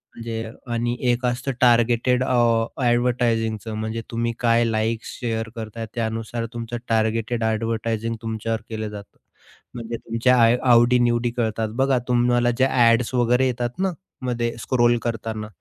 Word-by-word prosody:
म्हणजे 115 -1 -5 0.2
आणि 120 +1 -1 0.2
एक 120 +1 -1
असतं 125 +2 -1
टार्गेटेड 120 +1 +3
ॲडव्हर्टायझिंगच 120 -2 +1
म्हणजे 110 +1 -3
तुम्ही 115 0 -1
काय 115 -1 +3
लाइक्स, 110 0 -1
शेअर 115 -2 -2
करताय 115 0 -6
त्यानुसार 115 0 -3
तुमचं 120 0 -5
टार्गेटेड 115 +1 0
ॲडव्हर्टायझिंग 115 0 -1
तुमच्यावर 115 0 -3
केलं 110 -1 -4
जातं. 105 -1 -11 0.6
म्हणजे 115 -1 -5
तुमच्या 115 +3 +1 0.4
आवडी-निवडी 120 0 +4
कळतात, 110 -2 -1
बघा 135 0 +2
तुम्हाला 120 0 +2
ज्या 130 0 +3 0.2
ॲड्स 115 +2 +1
वगैरे 125 +1 +3
येतात 120 +1 -3
ना 190 0 +1 0.3
मध्ये 120 -1 -1
स्क्रोल 120 0 +2
करताना 110 -2 -3
115 Hz, 125 wpm, -23 LUFS, 115-120 Hz, 0.6 s, आवडी-निवडी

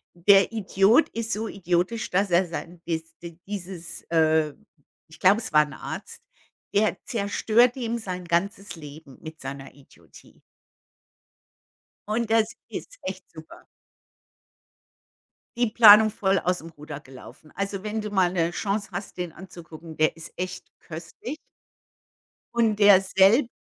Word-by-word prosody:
Der 195 +3 +5
Idiot 215 - +3
ist 230 0 -5
so 220 +2 -2
idiotisch, 185 +3 -1
dass 195 0 0
er 175 +2 +3
sein, 170 +1 -7
dies 165 -1 -4
d 170 -1 -10
dieses 185 -4 -7
äh, 160 -2 +2 0.5
ich 160 0 -16
glaube, 200 +5 +4
es - - -7
war 150 - +7
'n - - -11
Arzt, - - -8 0.5
der 210 +1 +2
zerstört 225 +3 +2
ihm 235 -2 -3
sein 185 -4 -6
ganzes 195 +5 -2
Leben 150 -3 -12
mit 160 0 -10
seiner 135 0 -8
Idiotie. 140 -1 -20 1.7
Und 225 +1 -1
das 225 0 +2
ist - - -8
echt 185 0 -6
super. 160 -1 -13 1.9
Die 240 -2 +2
Planung 215 -1 +8
voll 195 -2 +1
aus 180 +1 0
dem 165 - -10
Ruder 150 -2 -9
gelaufen. 135 +2 -14
Also, 195 -1 -3
wenn 215 +1 -3
du 210 - -5
mal 190 -3 +2
'ne 170 -2 0
Chance 200 +3 -3
hast, 195 +3 -6
den 180 -2 -4
anzugucken, 170 -3 -12
der 155 0 +2
ist 165 0 -10
echt 185 0 -5
köstlich. 165 - -8 1.2
Und 225 -3 +2
der 200 -2 +7
selb 195 +7 +4
185 Hz, 140 wpm, -25 LUFS, 165-215 Hz, 1.9 s, Planung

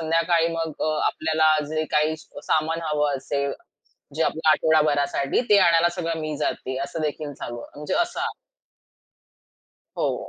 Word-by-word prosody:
संध्याकाळी 165 +1 +2
मग 165 -1 -2
अ, 155 - +1 0.2
आपल्याला 155 0 +2 0.2
जे 155 0 -1
काही 155 +1 +2
सामान 160 +2 -1
हवं 150 -2 0
असेल, 140 +1 -2 0.6
जे 160 - +2
आपल्या 160 0 +2
आठवडाभरासाठी 150 - +2
ते 205 - +7
आणायला 170 -1 +5
सगळं 165 -2 -2
मी 155 -1 -3
जाते 130 -2 -2
असं 160 - -6
देखील 150 -1 -3
चालू 120 -3 -7
आहे. - - -11
म्हणजे 150 - -3
असं 350 +1 -4 1.8
हो, - - -1
155 Hz, 140 wpm, -24 LUFS, 150-165 Hz, 1.8 s, ते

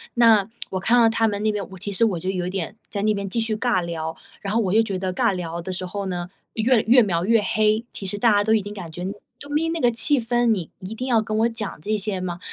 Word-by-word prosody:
那， 225 -4 +5 0.2
我 185 - -1
看 230 +6 +3
到 230 - +6
他 225 0 +2
们 205 -1 -2
那 215 - +2
边 205 -2 -4
我 190 - -9
其 205 +3 -4
实 200 +3 +1
我 190 -6 0
就 185 - -3
有 180 -2 -2
一 - - -2
点 190 +1 -4
在 200 - -2
那 215 0 +3
边 200 -1 -3
继 230 - -1
续 225 -1 0
尬 220 -5 +1
聊。 160 -1 -4 0.3
然 200 0 -3
后 230 - +3
我 190 -3 0
又 220 - +6
觉 205 -4 -2
得 185 -1 -2
尬 180 - +2
聊 170 -2 -4
的 185 - -5
时 185 0 -3
候 200 +2 -4
呢， 175 -1 -4 0.2
越 230 +1 +3
越 245 +3 +6
描 175 -6 0
越 225 +1 +4
黑， 215 +2 +2
其 195 - -5
实 195 +2 -1
大 230 +2 +4
家 205 0 +4
都 220 +1 +2
已 220 - +3
经 205 +1 -7
感 180 -5 -8
觉： 175 +3 -6 0.4
“都 285 - -9
没 305 +3 +1
那 330 0 -2
个 245 - +4
气 265 +5 +2
氛， 240 +1 +1
你 195 -8 +1
一 190 +3 -7
定 255 +3 -4
要 235 -3 +3
跟 215 0 -3
我 230 +1 +3
讲 225 -7 -5
这 215 +5 -1
些 200 -1 -3
吗？” 175 -1 -4
210 Hz, 310 characters per minute, -23 LUFS, 185-225 Hz, 0.4 s, 到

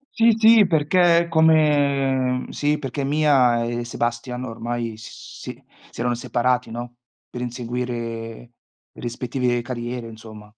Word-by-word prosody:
Sì, 230 -2 +5
sì, 225 -1 +6
perché 170 +1 +3
è 170 - -2
come 140 -5 +2
sì, 150 +1 0
perché 135 -1 -4
Mia 135 -5 +3
e 120 0 -3
Sebastian 120 +1 -3
ormai, 115 -1 -4
s 110 - -12
si - - -8 0.3
si - - -10
erano 120 0 0
separati, 125 0 0
no, 120 +1 -7 0.3
per 125 - -7
inseguire 125 0 -4 1.0
le - - -14
rispettive 120 0 -2
carriere, 120 -1 -5
insomma. 110 -1 -12
125 Hz, 130 wpm, -22 LUFS, 120-145 Hz, 1.0 s, sì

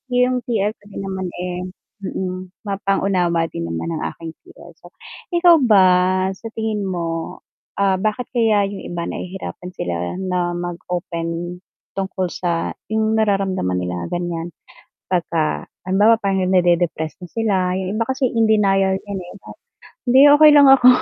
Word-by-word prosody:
'yung 250 0 +3
TL 210 -3 +1
ko 215 - -23
din 200 - -7
naman, 190 -1 -4
eh, 180 0 -4 0.4
mm, 185 0 -6
mapang-unawa 195 -4 0
din 85 - -4
naman 85 - -4
ang 160 - -3
aking 165 -1 -8
TL. - - -15
So, - - -17 0.4
ikaw 345 -1 +6
ba 215 -8 +5 0.5
sa 195 +4 -8
tingin 215 -3 -2
mo, 165 -3 -4 0.4
ah, 195 -2 +1
bakit 215 +4 -2
kaya 225 -4 +3
'yung 200 - -7
iba 170 -1 -4
nahihirapan 180 0 -6
sila 85 0 -3
na 180 -2 -2
mag-open 175 0 -4 0.3
tungkol 190 -2 -3
sa 170 -2 -2 0.2
'yung 220 0 +1
nararamdaman 195 - 0
nila 90 -1 -3
ganiyan, 175 - -3 0.6
'pagka 165 -3 -1 0.2
halimbawa 205 +4 +4
parang 190 -3 0
nade-depress 175 -4 +1
na - - -6
sila, 225 -3 0 0.2
'yung 190 +1 -3
iba 225 - 0
kasi, 260 +3 0
in 225 -1 +3
denial 195 -2 +3
'yan, 200 0 -6
eh, 175 - -11
'no, - - -12 0.5
"hindi 255 +2 +5 0.2
okey 305 -1 +9
lang 285 -2 +8
ako," 260 -2 +6
190 Hz, 150 wpm, -20 LUFS, 175-215 Hz, 0.6 s, okey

